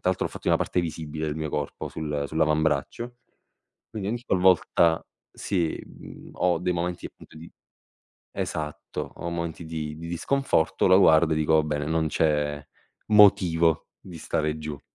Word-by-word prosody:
l'altro 95 - 0
l'ho - - -1
fatto - - -11
in - - +5
una - - +1
parte 90 - 0
visibile 80 -2 -4
del 75 - -3
mio 80 -1 -3
corpo, 75 -1 -4
sul 75 -2 -3
sull'avambraccio, 80 - 0 0.7
quindi 100 -2 -4
ogni 120 +1 -3
qualvolta 90 -3 +3 0.3
sì, 85 -5 -2
mhmm, - - -13
ho 90 -2 +1
dei 90 0 0
momenti 85 +1 -3
appunto 80 - -12
di 85 +2 -11 0.8
esatto, 75 0 -5
ho 85 - -5
momenti 85 0 -4
di 80 -2 -5
di 85 +1 -8
disconforto, 85 0 +1
lo 95 0 +6
guardo 80 -3 +5
e - - +1
dico: 80 +1 +2
"Va 80 - +5
bene, 75 -1 -2
non 80 0 0
c'è 75 -2 0 0.4
motivo 90 -6 +4
di 90 -3 -11
stare 75 0 -1
giù". 75 -2 -6
80 Hz, 160 wpm, -25 LUFS, 75-90 Hz, 0.8 s, lo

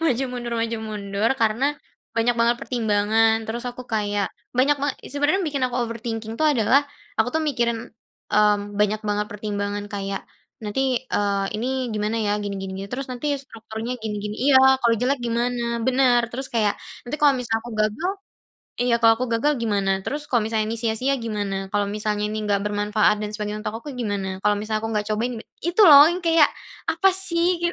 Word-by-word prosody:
maju-mundur 250 -4 -1
maju-mundur 215 -2 -2
karena, 225 +3 +2 0.5
banyak 235 +1 +2
banget 235 +1 +3
pertimbangan 220 -1 +2
terus 235 +2 -5
aku 245 +1 -7
kayak 205 -2 0 0.3
banyak 275 +3 +4
banget 285 -1 -1 0.2
sebenernya 290 +5 +2
yang - - -2
bikin 280 -2 -2
aku 245 - -4
overthinking 230 -1 -4
tuh 310 - +4
adalah, 255 +3 +4 0.4
aku 220 - +2
tuh 320 - +2
mikirin, 240 -5 0 0.6
mmm, 210 0 +4 0.2
banyak 210 +1 +2
banget 210 0 0
pertimbangan 205 0 -3
kayak, 195 -1 -3 0.4
"Nanti, 255 +4 0
eee, 200 -1 +1
ini 235 - -2 0.2
gimana 215 +1 -1
ya 205 0 0
gini 200 -1 -3
gini 195 - -5
gini 195 - -5
terus 260 +1 -4
nanti 270 +4 -1
strukturnya 225 0 -6
gini 215 -1 -3
gini" 210 0 -4
iya, 265 -1 +6
"kalau 235 -2 +3
jelek 265 +3 +1
gimana? 235 0 -1
Bener 255 -2 +4
terus 265 +2 -5
kayak 215 -3 +1 0.2
nanti 250 +5 -4
kalau 290 -2 +5
misal 235 -3 -1
aku 235 +2 -10
gagal, 220 - -1 0.7
iya 245 -1 +3
kalau 225 0 +7
aku 255 - -1
gagal 290 +6 +2
gimana? 205 -4 0 0.2
Terus 295 +1 -2
kalau 240 - +4
misalnya 220 -1 0
ini 230 - -3
sia-sia 230 +4 0
gimana? 205 -4 -3
Kalau 205 -1 +2
misalnya 210 0 -2
ini 215 - -3
enggak 200 -1 +1
bermanfaat 210 0 +1
dan 210 0 -5
sebagainya 210 0 -3
untuk 215 - -2
aku 295 - -7
gimana? 195 -4 -2
Kalau 210 - +3
misal 215 +1 -2
aku 220 - -4
nggak 210 0 -1
cobain" 225 +4 0 0.4
itu 360 +5 +4
loh 285 0 +10
yang 350 +2 -1
kayak 330 -3 +5 0.4
apa 340 +4 +3
sih 360 -2 +2
225 Hz, 180 wpm, -23 LUFS, 210-255 Hz, 0.7 s, loh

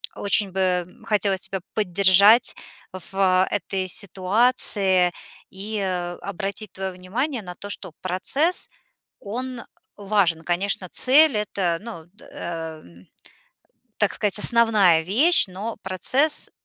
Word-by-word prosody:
очень 200 0 0
бы 180 -2 -1 0.2
хотелось 200 -3 0
тебя 190 -2 -4
поддержать 200 +3 +4 0.4
в 185 0 0
этой 190 -1 -3
ситуации 195 -1 +2 0.4
и 205 +3 -6 0.4
обратить 200 +1 -6
твое 190 0 -5
внимание 230 +8 -4
на 180 -2 -10
то, 200 - -10
что 185 -5 -6
процесс- 270 - 0 0.5
он 250 +4 -6 0.4
важен. 195 -5 0
Конечно, 185 +2 0
цель- 275 -1 +5
это, 190 -5 -2
ну, 210 -8 -9 0.2
э, 165 -2 -7
м, 85 +2 -19 0.9
так 205 - +1
сказать, 205 -2 +2
основная 215 -8 +4
вещь, 255 - +4
но 200 +5 -7
процесс- 255 - +1
195 Hz, 110 wpm, -22 LUFS, 185-220 Hz, 0.9 s, цель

